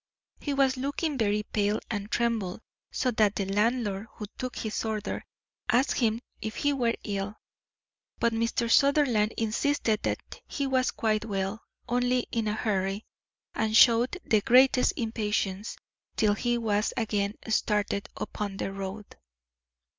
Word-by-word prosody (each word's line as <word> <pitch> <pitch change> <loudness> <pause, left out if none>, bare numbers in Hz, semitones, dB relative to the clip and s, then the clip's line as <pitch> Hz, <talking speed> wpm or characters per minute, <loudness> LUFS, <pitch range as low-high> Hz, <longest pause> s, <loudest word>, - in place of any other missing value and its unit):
He 285 -2 -2
was 270 -1 +3
looking 285 +3 -1
very 210 -3 +1
pale, 210 0 0
and 205 -1 -3
trembled 225 -5 -1 0.3
so 255 - 0
that 215 -3 +2
the 195 - -1
landlord, 210 0 0
who 210 - -6
took 255 -1 -4
his 215 -1 -3
order, 215 -2 -3 0.5
asked 245 +5 +3
him 230 -1 +1 0.2
if 220 0 -4
he 290 0 +1
were 240 -4 +1
ill. 200 0 -3 0.8
But 235 0 +1
Mr. 230 +1 0
Sutherland 275 -7 +4
insisted 225 0 +1
that - - 0 0.3
he 280 - -2
was 260 -1 +2
quite 215 -1 0
well, 200 +1 -2 0.3
only 250 +1 +2
in 225 -2 -1
a 210 - +1
hurry, 200 -1 -1 0.5
and 220 0 +2
showed 240 +7 +6
the 215 -2 +3
greatest 255 +3 +5
impatience 210 -3 -2 0.4
till 210 -2 +3
he 240 +3 0
was 215 -2 0
again 210 -2 0
started 210 -2 0
upon 200 -2 -4
the 195 - -3
road. 195 +2 -5
220 Hz, 140 wpm, -28 LUFS, 205-245 Hz, 0.8 s, showed